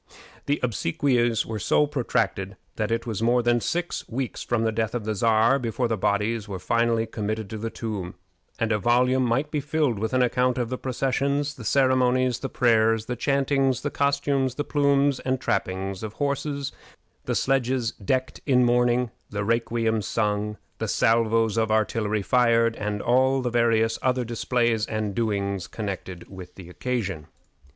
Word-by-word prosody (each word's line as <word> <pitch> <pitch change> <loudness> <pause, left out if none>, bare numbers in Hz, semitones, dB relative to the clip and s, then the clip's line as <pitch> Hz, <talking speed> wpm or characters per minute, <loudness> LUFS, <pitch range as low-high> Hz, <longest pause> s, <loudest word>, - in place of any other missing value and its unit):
The 145 +1 +1
obsequies 120 +2 +1
were 110 -1 -4
so 150 - +3
protracted 115 -8 -1 0.2
that 110 -1 -1
it 115 0 -1
was 110 -3 -3
more 120 +1 +3
than 120 0 +2
six 175 +5 -3
weeks 125 +1 -3
from 120 -2 0
the 110 - +1
death 110 +1 -2
of 115 -4 -3
the 110 - -1
Czar 115 +5 +3
before 120 0 -1
the 115 - 0
bodies 105 +2 0
were 95 - -4
finally 115 +3 +1
committed 110 -1 -4
to 110 - -5
the 115 +1 -3
tomb; 105 -6 -5 0.4
and 115 -1 0
a 105 - +2
volume 125 +4 +3
might 135 +5 0
be 150 - 0
filled 145 -6 0
with 110 +3 -2
an 130 - +4
account 125 +1 +1
of 120 -2 -1
the 130 - -3
processions, 140 +3 -1
the 125 - -11
ceremonies, 130 0 +2
the 135 - -4
prayers, 115 -2 +2
the 125 - -3
chantings, 135 0 +1
the 145 - -2
costumes, 140 -2 0
the 145 - -2
plumes 140 -2 +2
and 130 0 -1
trappings 95 -4 -2
of 110 -1 -5
horses, 140 0 -2 0.5
the - - -1
sledges 130 -3 +1
decked 130 +6 -2
in 125 -3 +4
mourning, 120 0 +2 0.2
the 100 0 -3
requiems 115 -1 0
sung, 105 -1 -1 0.2
the - - -2
salvos 115 -1 +2
of 110 -1 +1
artillery 110 -1 0
fired, 115 0 +3
and 105 -1 -3
all 130 +2 +3
the 125 - -1
various 115 -1 +2
other 125 -1 +1
displays 115 -1 0
and 110 -2 -2
doings 100 -4 -1
connected 95 -4 -6
with 95 -2 -11
the 90 -3 -11
occasion. 95 - -3
115 Hz, 170 wpm, -25 LUFS, 110-130 Hz, 0.5 s, an